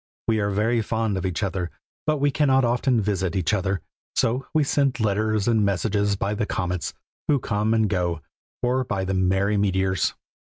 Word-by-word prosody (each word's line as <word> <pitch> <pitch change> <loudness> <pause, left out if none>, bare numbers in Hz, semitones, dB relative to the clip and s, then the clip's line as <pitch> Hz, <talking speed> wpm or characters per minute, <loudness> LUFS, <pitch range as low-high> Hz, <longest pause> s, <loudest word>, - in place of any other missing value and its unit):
We 110 -1 +2
are 100 -1 +1
very 110 +4 +1
fond 110 -1 -1
of 95 0 -1
each 90 +4 -2
other, 95 -2 -2 0.4
but 155 0 +3
we 145 0 +2
cannot 135 -3 +3
often 120 +1 +2
visit 95 -2 -1
each 90 -2 +1
other, 95 -2 0 0.3
so 125 +4 +1
we 155 -1 +3
send 140 -2 +1
letters 110 0 +1
and 110 -3 +3
messages 100 +1 +1
by 100 +1 -1
the 105 0 -1
comets, 90 -2 -2 0.3
who 145 - +4
come 105 -3 0
and 110 -1 +3
go, 90 -5 -1 0.4
or 125 +2 +2
by 95 -5 -2
the 95 - -1
merry 95 +2 +2
meteors. 95 -3 +1
105 Hz, 180 wpm, -24 LUFS, 95-115 Hz, 0.4 s, who